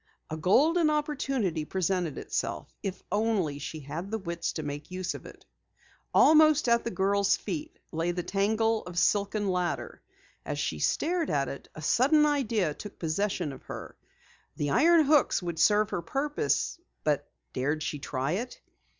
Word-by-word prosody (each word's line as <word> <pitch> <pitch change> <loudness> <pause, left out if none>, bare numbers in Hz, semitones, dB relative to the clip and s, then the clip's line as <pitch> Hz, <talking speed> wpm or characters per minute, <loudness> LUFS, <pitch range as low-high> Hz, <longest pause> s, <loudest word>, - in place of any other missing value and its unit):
A - - -1
golden 305 - +4
opportunity 275 - -1
presented 180 -2 -1
itself, - - -3
if 190 -2 -5
only 205 -9 0
she 155 +2 -6
had 155 +7 -6
the 220 - -1
wits 170 -4 -3
to 155 - -4
make 145 0 -6
use 185 0 -3
of - - -9
it. - - -14 0.7
Almost 310 -2 +6
at 235 0 +3
the - - -2
girl's 200 -1 +2
feet 310 0 -5
lay 165 +1 -1
the 175 0 -2
tangle 220 +3 +1
of 175 -1 -8
silken 205 +3 +2
ladder. 180 -2 -2 0.4
As - - -4
she - - -2
stared 340 -1 0
at 140 -1 0
it, 140 - -8
a 155 - -8
sudden 295 - +4
idea 230 - +1
took 210 +6 -10
possession 170 -2 -1
of - - -11
her. - - -8 0.6
The 145 -1 -1
iron 330 - +5
hooks 285 -9 +3
would 170 -2 -4
serve 210 +4 +4
her - - -1
purpose, 290 - -1 0.2
but 150 -2 0 0.2
dared 150 +4 -1
she 150 -1 -3
try 135 +1 -2
it? 235 +8 -3
195 Hz, 160 wpm, -28 LUFS, 160-255 Hz, 0.7 s, Almost